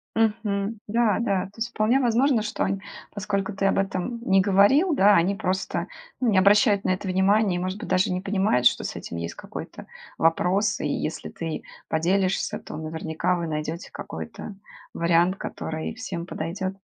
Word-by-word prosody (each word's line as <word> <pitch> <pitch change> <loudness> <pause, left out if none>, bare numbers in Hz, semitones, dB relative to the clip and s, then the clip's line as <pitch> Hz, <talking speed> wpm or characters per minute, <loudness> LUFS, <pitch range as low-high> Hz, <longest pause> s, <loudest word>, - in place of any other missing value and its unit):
Мгм. 215 -1 0
Да, 220 -1 +2
да. 200 -4 0
То 195 - -13
есть, 230 +2 -2
вполне 230 +4 +2
возможно, 245 0 +3
что 210 0 -2
он 195 0 -1 0.3
поскольку 205 0 -2
ты 195 0 -1
об 195 - +2
этом 195 +4 -2
не 195 0 +6
говорил, 205 - +4
да. 205 -4 +5
Они 185 +3 +3
просто, 190 -2 -2 0.3
ну, 250 -3 +2
не 195 - +3
обращают 200 +1 +5
на - - 0
это 190 +1 -5
внимание 190 +1 +3
и, - - -2
может 185 +1 -3
быть, - - -6
даже 185 0 +2
не 180 - -1
понимают, 195 - +1
что - - +4
с - - -4
этим - - -7
есть 85 0 -5
какой-то - - -9 0.3
вопрос. 185 +6 +2
И, 150 - -1
если 155 +2 -3
ты 165 -2 -5 0.2
поделишься, 185 +4 0
то - - -9
наверняка 160 +3 -2
вы 170 -1 -3
найдете 155 +3 -4
какой-то 205 - -7 0.4
вариант, 170 +3 +2
который 160 +5 -5
всем 190 -8 -5
подойдет. 185 +3 -4
195 Hz, 175 wpm, -25 LUFS, 175-210 Hz, 0.4 s, не